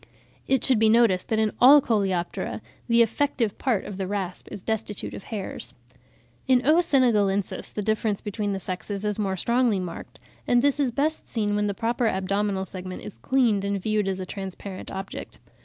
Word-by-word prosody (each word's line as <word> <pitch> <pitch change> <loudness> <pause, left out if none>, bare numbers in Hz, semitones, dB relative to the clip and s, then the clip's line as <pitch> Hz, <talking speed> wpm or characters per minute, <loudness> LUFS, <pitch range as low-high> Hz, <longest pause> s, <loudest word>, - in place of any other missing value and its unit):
It 265 -3 +2
should 255 -4 +3
be 220 0 +5
noticed 220 -5 +3
that 220 - +1
in 220 -1 +2
all 275 +4 +9
Coleoptera 195 -8 -1 0.3
the 235 -1 +5
effective 230 -2 -1
part 240 -7 0
of 195 - -7
the 190 -1 -3
rasp 190 -3 -4
is 205 -3 -7
destitute 220 -2 -3
of - - -8
hairs. 205 -4 -6 0.7
In 255 -1 +3
O. 310 +3 +5
senegalensis 210 - +1
the 210 - -4
difference 215 -1 0
between 205 0 -3
the 195 - -2
sexes 195 +2 -4
is 210 0 -1
more 195 -2 -1
strongly 235 0 +2
marked, 180 -2 -7 0.3
and 245 0 +3
this 285 0 +2
is 275 -3 +2
best 300 +6 -1
seen 210 -3 -1
when 210 0 +1
the 200 - -2
proper 235 +2 0
abdominal 195 0 0
segment 185 0 -7
is 115 - -9
cleaned 230 - +2
and 200 0 -1
viewed 210 0 0
as 190 -1 -1
a 185 - -4
transparent 195 0 -7
object. 195 0 -7
210 Hz, 185 wpm, -25 LUFS, 195-235 Hz, 0.7 s, all